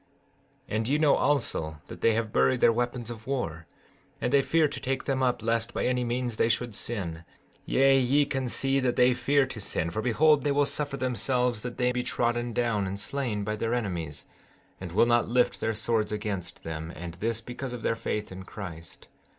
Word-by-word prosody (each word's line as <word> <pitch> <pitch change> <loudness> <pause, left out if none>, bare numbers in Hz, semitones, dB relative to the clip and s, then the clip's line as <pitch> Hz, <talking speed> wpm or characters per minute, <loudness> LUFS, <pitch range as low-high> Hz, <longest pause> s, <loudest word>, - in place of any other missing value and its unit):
15:9 - - -4
And 110 0 -1
ye 145 +3 +2
know 150 -2 +4
also 80 - 0
that - - -10
they 115 - +4
have 110 -1 -2
buried 130 -1 +3
their 115 - +5
weapons 120 0 -2
of 110 -1 -10
war, 85 -12 -3 0.5
and 125 - -1
they 140 - +6
fear 160 +2 +3
to - - -6
take 135 0 -2
them 135 -1 -1
up 125 -3 +1
lest 115 +1 0
by - - 0
any 125 0 +1
means 120 -1 -2
they 115 - +3
should 120 0 0
sin; 90 -8 -4 0.4
yea, 135 0 +5
ye 135 +3 +3
can 135 -2 -2
see 135 +3 +1
that 130 -2 +1
they 125 0 +5
fear 135 +3 +2
to 130 -4 -7
sin—for 85 +1 -2
behold 145 +6 +4
they 145 - +1
will 145 +1 +3
suffer 145 -1 -3
themselves 125 -2 0
that 125 +1 -6
they 125 0 +2
be 125 0 -1
trodden 120 0 -1
down 110 -4 0
and 100 +1 -4
slain 120 -4 -2
by 105 +1 -2
their 115 +2 -1
enemies, 85 -10 -3 0.5
and 95 -3 -6
will 105 +6 +4
not 120 -1 +2
lift 125 +1 +2
their 110 0 -1
swords 110 -1 0
against 100 -5 -4
them, 80 0 -5
and 85 0 -7
this 115 +2 0
because 125 +3 -6
of 125 -2 -6
their 115 - +1
faith 105 -2 -3
in 95 0 -7
Christ. 90 -4 -9
120 Hz, 205 wpm, -28 LUFS, 105-130 Hz, 0.5 s, they